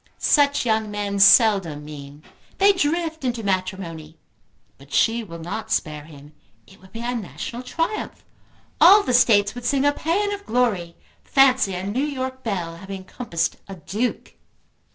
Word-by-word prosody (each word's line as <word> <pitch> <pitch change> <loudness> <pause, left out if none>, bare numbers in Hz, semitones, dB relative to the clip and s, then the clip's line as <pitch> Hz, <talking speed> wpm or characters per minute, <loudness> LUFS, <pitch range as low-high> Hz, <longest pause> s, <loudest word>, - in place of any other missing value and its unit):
Such 285 -3 +2
young 220 -2 0
men 205 -1 -3
seldom 195 - +5
mean. 145 0 -11 0.3
They 400 +1 +5
drift 325 -2 -1
into 240 -3 -2
matrimony. 185 -5 -4 0.6
But 140 +1 -17
she 230 +9 +2
will 170 -5 -9
not 180 +7 -6
spare 150 -2 -2
him. 145 -1 -15 0.3
It 190 - -20
would 190 0 -18
be 230 - -7
a 245 +1 -2
national 235 +2 -6
triumph. 330 +10 -4 0.6
All 410 +1 +8
the 250 - -1
States 210 -4 +4
would 245 0 -9
sing 275 +2 +1
a 290 - +3
pæan 400 +8 -1
of 405 0 -8
glory. 210 -9 0 0.3
Fancy 260 -8 +3
a 180 +1 -5
New 210 +7 -2
York 260 -3 -4
belle 175 -7 -4
having 190 +1 -8
compassed 170 -6 -3
a 195 - -8
Duke!" 205 +9 -4
215 Hz, 155 wpm, -22 LUFS, 175-260 Hz, 0.6 s, All